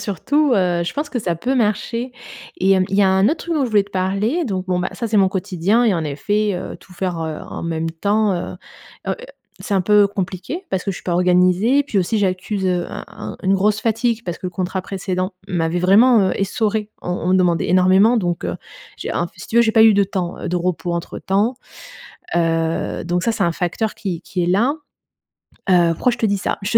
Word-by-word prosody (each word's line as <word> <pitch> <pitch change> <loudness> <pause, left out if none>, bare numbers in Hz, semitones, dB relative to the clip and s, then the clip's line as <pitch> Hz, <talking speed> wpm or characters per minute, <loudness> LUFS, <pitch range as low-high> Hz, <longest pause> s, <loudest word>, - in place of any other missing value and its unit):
surtout, 280 - +1
heu, 180 -3 +1
je 170 - -2
pense 290 0 -3
que 245 - -2
ça 175 -6 -1
peut 250 +10 -1
marcher. 230 +2 -1 0.4
Et 190 +1 +1
hem, 185 -1 +3
il 195 - -1
y 205 - +5
a 195 - +4
un 190 +1 +3
autre 320 - +1
truc 335 -1 -2
dont 280 -4 +1
je - - -4
voulais 210 -2 +4
te 200 - -20
parler, 200 - 0
donc 190 -4 -2
bon 180 -1 0
bah, 180 - -1
ça, 235 - -3
c'est 215 -1 +2
mon 190 -1 +4
quotidien 190 +4 +1
et 215 - +4
en 165 - -1
effet, 205 +8 -1
heu, 180 - -5
tout 180 - -17
faire, 180 -1 -2
heu, 160 -1 -4
en - - -7
même 165 -1 -2
temps 205 +5 +1 0.2
heu - - -10 0.5
heu - - +1 0.5
c'est 205 - -2
un 190 - +3
peu 205 +1 +5
compliqué 195 - -4
parce 185 - -1
que 195 - -2
je 180 - -5
suis - - -11
pas 175 - -1
organisée. 180 +8 +3
Puis 210 -8 -1
aussi, 200 +4 0
j'accuse, 190 +1 -1
heu, 180 -1 0
un - - -7
un - - -8
une 190 +1 +2
grosse 210 +2 +1
fatigue 230 0 0
parce 175 - -4
que 185 - -5
le - - -4
contrat 185 +1 -2
précédent 185 0 -3
m'avait 175 -2 -1
vraiment, 215 +6 +5
heu, - - -2
essorée. 210 +1 -1
On 180 - -4
on 180 0 -2
me 185 - +4
demandait 175 -3 +2
énormément 190 +6 +5
donc, 175 - -1
heu, 85 - -3 0.4
j'ai - - -5
un, 175 - 0
f - - -17
si 175 - -10
tu 230 - -3
veux, 235 - +7
j'ai 220 -1 +1
pas 220 - +6
eu 220 - +7
de 200 0 +3
temps, 185 -3 -4
heu, - - -4
de 180 - 0
repos 175 0 -1
entre 170 0 -5
temps. 210 +6 0 0.8
Heu, 165 -1 0
donc 175 +1 -1
ça 230 - +2
c'est - - -1
un 170 - +2
facteur 180 +6 -2
qui 180 -5 -4
qui 180 -2 -3
est - - 0
là. 230 +11 +2 0.9
Heu, 175 -2 +5
pourquoi 250 - +1
je 240 - -6
te 225 - 0
dis 200 -1 +1
ça? - - -2
Je 205 +3 +3
190 Hz, 240 wpm, -20 LUFS, 180-215 Hz, 0.9 s, veux